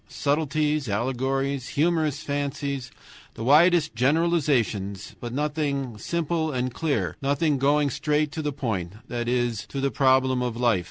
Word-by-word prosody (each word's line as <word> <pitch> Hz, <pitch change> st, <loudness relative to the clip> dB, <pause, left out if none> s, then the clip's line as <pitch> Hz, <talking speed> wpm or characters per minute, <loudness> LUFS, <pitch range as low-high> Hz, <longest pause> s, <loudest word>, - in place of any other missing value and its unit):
Subtleties, 150 Hz, -1 st, 0 dB
allegories, 130 Hz, +4 st, -1 dB
humorous 155 Hz, -2 st, +1 dB
fancies, 140 Hz, -2 st, -3 dB, 0.5 s
the 115 Hz, -, -6 dB
widest 155 Hz, +4 st, +5 dB
generalizations, 125 Hz, -, +1 dB
but 120 Hz, -, -6 dB
nothing 140 Hz, -3 st, -2 dB
simple 165 Hz, +3 st, -1 dB
and 130 Hz, -2 st, -2 dB
clear, 115 Hz, -, -1 dB
nothing 140 Hz, +1 st, +1 dB
going 145 Hz, +1 st, +2 dB
straight 150 Hz, +2 st, 0 dB
to 160 Hz, -, -4 dB
the 150 Hz, -1 st, -1 dB
point, 100 Hz, -10 st, -3 dB, 0.2 s
that 120 Hz, -1 st, -3 dB
is, 120 Hz, -3 st, -1 dB
to 140 Hz, -, -5 dB
the 135 Hz, 0 st, 0 dB
problem 130 Hz, +1 st, +3 dB
of 120 Hz, -2 st, -2 dB
life. 120 Hz, -5 st, +3 dB
140 Hz, 140 wpm, -25 LUFS, 125-150 Hz, 0.5 s, widest